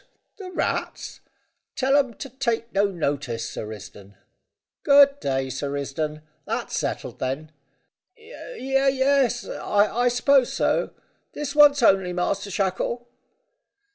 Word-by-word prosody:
The 385 -3 -8
rats? 365 - -3 0.6
Tell 270 -1 +2
'em 265 -5 +2
to 275 - -8
take 235 -3 -2
no 200 +1 +3
notice, 140 - -2
Sir 105 - -6
Risdon. 105 -1 -11 0.7
Good 280 0 +6
day, 135 -1 -2
Sir 135 +2 -4
Risdon. 150 +2 -4 0.2
That's - - -3
settled, - - -3
then?" 140 +4 -3 0.7
"Ye 440 - -4
es 270 -2 +2
I 215 +4 +1
suppose 250 +1 +3
so. - - 0 0.4
This 290 -1 -4
once 290 -3 +6
only, 190 -4 +4
Master 195 +3 -2
Shackle." 200 +6 -2
230 Hz, 115 wpm, -24 LUFS, -, 0.7 s, Good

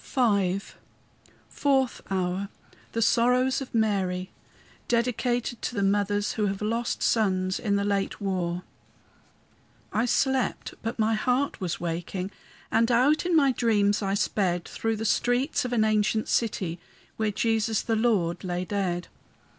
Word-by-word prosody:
V 200 -7 +1 0.9
FOURTH 270 -3 +1
HOUR 190 +1 -1 0.4
THE 230 - +1
SORROWS 250 +4 +3
OF 260 - -7
MARY 190 -4 0 0.6
DEDICATED 240 0 0
TO 245 - -3
THE 200 - 0
MOTHERS 205 +1 +1
WHO 210 -2 0
HAVE 195 +1 -3
LOST 230 +2 -1
SONS 185 -4 +1
IN 205 -3 0
THE 200 - +1
LATE 200 -1 -1
WAR 180 -3 -2 1.3
I 220 +3 +2
slept, 265 +1 0
but 225 +2 -4
my 220 0 +2
heart 250 +4 0
was 175 -3 -2
waking, 175 +3 -3 0.4
And 230 +1 +3
out 280 +8 +3
in 350 - +2
my 280 -4 +5
dreams 210 -4 +2
I 195 -1 0
sped, 180 -4 0
Through 225 0 -2
the 220 +1 -4
streets 245 +6 +1
of 250 - -3
an 230 -3 +3
ancient 215 0 +1
city, 185 -7 -1 0.4
Where 220 -1 +1
Jesus, 220 +1 0
the 225 - 0
Lord, 205 -7 +1
lay 180 0 -2
dead. 180 -3 -2
215 Hz, 140 wpm, -26 LUFS, 195-240 Hz, 1.3 s, my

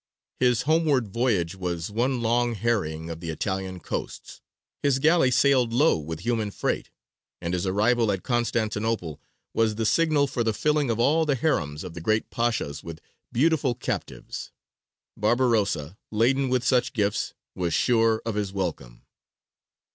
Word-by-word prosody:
His 125 -1 +3
homeward 150 -6 +2
voyage 100 -6 0
was 90 -1 -4
one 120 +3 0
long 120 +1 +1
harrying 85 -8 -1
of 80 - -6
the 85 -1 -6
Italian 95 +3 -3
coasts; - - -6 0.4
his 140 -2 +2
galley 155 0 +4
sailed 125 -2 +3
low 145 +7 +4
with 80 +2 -6
human 115 -2 -1
freight; - - -2 0.5
and 85 +1 -3
his 90 +1 -1
arrival 110 +3 +2
at 95 -2 -3
Constantinople 110 - -1 0.3
was 110 -1 +2
the 110 +1 -1
signal 155 +2 +3
for 130 -3 -2
the 110 -1 +1
filling 150 0 +1
of 115 -1 0
all 155 +7 +3
the 145 - +2
harems 80 - -1
of 85 - -7
the 85 - -7
great 110 +5 0
pashas 115 -12 -1
with 80 -1 -8 0.3
beautiful 140 -2 +2
captives. - - -5 0.6
Barbarossa, 105 - +1
laden 130 +5 +2
with 125 -1 +1
such 125 +2 +2
gifts, 105 -4 -1 0.2
was 90 -2 -2
sure 115 -2 +2
of 115 - -1
his 105 -2 -2
welcome. 85 -11 -4
115 Hz, 150 wpm, -25 LUFS, 95-125 Hz, 0.6 s, galley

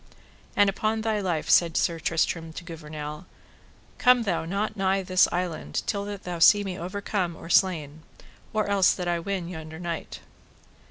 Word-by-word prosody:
And 205 - +5
upon 215 +3 0
thy 220 -1 0
life, 175 -6 -2
said 170 -3 +4
Sir 170 -1 +1
Tristram 165 0 -1
to 175 - -7
Gouvernail, 150 -1 -7 0.7
come 250 -1 +5
thou 200 -6 -1
not 200 +5 -2
nigh 195 -1 +1
this 185 0 +4
island 175 -2 -3
till 200 -1 -2
that 205 -1 -6
thou 175 -1 -5
see 205 +5 +7
me 190 -2 -4
overcome 185 0 -3
or 165 - -8
slain, 160 -6 +2 0.5
or 215 -1 0
else 200 -2 +4
that 180 - -4
I 175 -1 +1
win 185 0 -3
yonder 160 -2 -8
knight. 170 -1 -5
180 Hz, 165 wpm, -26 LUFS, 165-200 Hz, 0.7 s, see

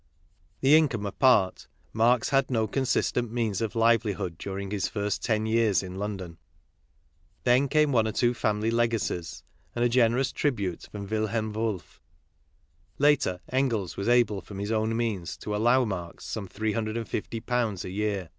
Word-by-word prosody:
That 135 - +2
income 145 -9 +4
apart, 100 -2 +2 0.3
Marx 115 +2 +3
had 135 -1 +2
no 115 -4 +1
consistent 120 0 0
means 115 -4 -1
of 110 -1 -2
livelihood 105 -6 +1
during 100 0 -5
his 100 -3 -1
first 105 -1 -2
ten 110 -2 +1
years 110 -4 +2
in 90 -1 -7
London. 95 -4 -5 1.0
Then 130 +3 +4
came 150 +1 +3
one 115 -4 +3
or - - -1
two 120 +2 +2
family 110 -1 0
legacies, 115 -7 -1 0.3
and 120 0 +1
a - - +3
generous 125 +2 +2
tribute 100 - -2
from 100 -1 -6
Wilhelm 110 +1 -1
WolfT; 105 -7 -3 1.0
later, 140 -11 +2
Engels 120 -8 0
was 100 +4 -2
able 120 -5 +3
from 100 +2 -10
his 100 +2 -3
own 110 0 0
means 105 -7 -2
to 105 - -4
allow 120 +4 +3
Marx 90 -5 -6
some 105 -3 -5
three 110 +3 -2
hundred 110 0 -2
and 115 - -4
fifty 115 +2 -4
pounds 115 -5 -1
a 90 - -6
year. 100 -3 -2
110 Hz, 165 wpm, -27 LUFS, 100-120 Hz, 1.0 s, income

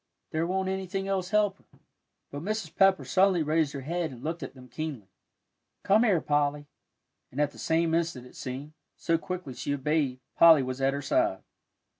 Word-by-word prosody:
There 160 +2 0
won't 190 +1 -1
anything 190 0 -3
else 190 -2 -1
help 205 -2 +2
her." - - -27 0.5
But 145 - -5
Mrs. 195 -3 -3
Pepper 195 -1 +4
suddenly 185 -3 +3
raised 155 -1 +1
her 140 - -5
head 165 +4 -2
and 125 -2 -11
looked 165 +2 -3
at 135 - -7
them 125 -1 -13
keenly. 125 -7 -6 0.7
"Come 205 +3 +4
here, 195 -9 +3
Polly," 145 0 0 0.7
and 130 - -6
at 145 -1 +2
the - - -15
same 165 0 +1
instant 165 -7 -1
it 125 - -15
seemed, 135 +4 -6 0.2
so 165 -1 +1
quickly 180 -6 -5
she 145 +4 -2
obeyed, 140 -2 0 0.2
Polly 160 -4 +7
was 130 +1 -4
at 135 +1 +2
her 140 - -4
side. 325 +2 +1
160 Hz, 185 wpm, -28 LUFS, 140-185 Hz, 0.7 s, Polly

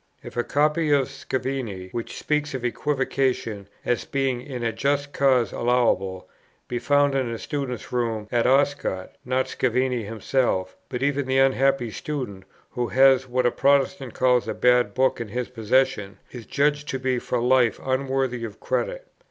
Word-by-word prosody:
If - - -10
a 120 - +1
copy 150 +3 +1
of 140 -3 +3
Scavini, 130 -8 -4
which 115 -1 -5
speaks 150 -1 -1
of 125 -2 -4
equivocation 130 -5 -1 0.2
as 120 -2 0
being 135 -3 -1
in 125 -2 -6
a 115 -1 0
just 140 +4 -1
cause 130 -5 +3
allowable, 110 -6 +1 0.4
be 120 - -2
found 145 +1 +3
in 130 -3 0
a 115 - -3
student's 130 -2 -4
room 115 -3 -1
at 120 -1 +2
Oscott, 135 -8 +1
not 130 +1 0
Scavini 125 -1 0
himself, 105 -3 -1
but 125 +1 -3
even 140 -1 0
the 130 0 +1
unhappy 135 -2 +3
student, 125 - -5 0.3
who 125 -2 -2
has 130 0 +5
what 125 0 0
a 120 - +4
Protestant 140 -2 +1
calls 125 -1 +3
a - - -3
bad 125 -4 +3
book 130 -1 +2
in 115 - -4
his 125 +4 -4
possession, 115 -3 0
is 120 -3 -9
judged 145 +1 +1
to 135 - -2
be 130 -1 0
for 125 - -2
life 125 -1 +3
unworthy 130 -2 -1
of 110 -2 -7
credit. - - -2
130 Hz, 165 wpm, -24 LUFS, 120-135 Hz, 0.4 s, has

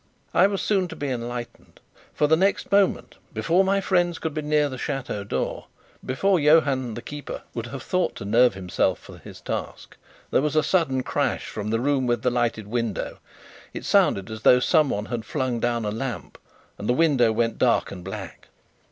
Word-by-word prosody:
I - - +5
was 200 -1 -2
soon 195 -3 +1
to 165 - -9
be 145 - -3
enlightened, 120 -1 -6 0.3
for 150 - +1
the 155 +2 +5
next 195 +4 0
moment 200 -1 +2 0.2
before 175 +3 +3
my 195 +1 +2
friends 175 -3 +1
could 160 -2 -4
be 155 - -2
near 150 0 +2
the 130 -2 -7
chateau 135 -7 -3
door 100 - -3 0.4
before 185 +8 +1
Johann 140 -6 +3
the 120 - -7
keeper 145 -2 -7
would 115 0 -4
have 135 +1 -7
thought 185 0 0
to - - -7
nerve 115 +1 +4
himself 90 -2 0
for - - -13
his - - -12
task - - -6 0.3
there - - +3
was 150 +1 -1
a 155 - +4
sudden 140 -6 +1
crash - - -1
from 105 0 -5
the 115 +1 +1
room 135 0 +1
with 120 -1 0
the 125 - +2
lighted 120 -3 -1
window. 115 0 -3 0.6
It - - -6
sounded 100 +2 +2
as 110 0 -7
though 125 - +6
someone 135 - +2
had 120 -1 -4
flung 130 -2 -2
down 120 -1 0
a 105 - -1
lamp; 115 - -5 0.4
and 105 - -4
the - - +4
window 135 -6 +3
went 115 +1 -1
dark - - +2
and 90 -2 -8
black. 95 +1 -8
130 Hz, 195 wpm, -24 LUFS, 115-155 Hz, 0.6 s, though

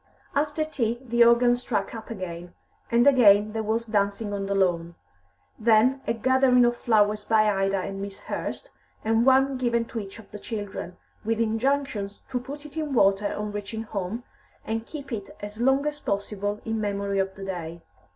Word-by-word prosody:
After 295 +2 0
tea 240 -6 -1
the 240 -2 +3
organ 240 +1 +5
struck 245 - -2
up 225 -1 -8
again, 175 -5 -7 0.3
and 235 +1 +4
again 215 -6 +6
there 220 - -1
was 220 +2 -1
dancing 205 -1 -1
on 195 -1 -3
the 200 - -1
lawn. 170 -3 +1 0.6
Then 230 +4 +4
a 230 - +2
gathering 255 +1 +4
of 240 0 +2
flowers 210 -3 +2
by 215 0 +3
Ida 195 -1 +1
and 195 +1 -4
Miss 200 0 -7
Hurst, - - -5 0.3
and 225 +3 +2
one 265 0 +4
given 235 -2 +1
to 230 - -5
each 195 -1 -8
of 225 - -14
the 210 - -8
children, 205 -5 -6 0.3
with 225 +1 -1
injunctions 225 -2 -1
to 250 - 0
put 285 +4 -8
it 300 +1 -11
in 300 -4 -2
water 200 -1 +3
on 210 0 -4
reaching 205 +2 -5
home, 210 +2 -4 0.4
and 225 +1 -3
keep 285 -3 -8
it 205 -4 -6
as 210 +2 -7
long 270 +3 +3
as 300 0 -2
possible 205 -1 -3
in 225 -1 -2
memory 200 -1 -1
of 190 0 -1
the 195 - -7
day. 170 -3 -5
220 Hz, 180 wpm, -26 LUFS, 200-245 Hz, 0.6 s, again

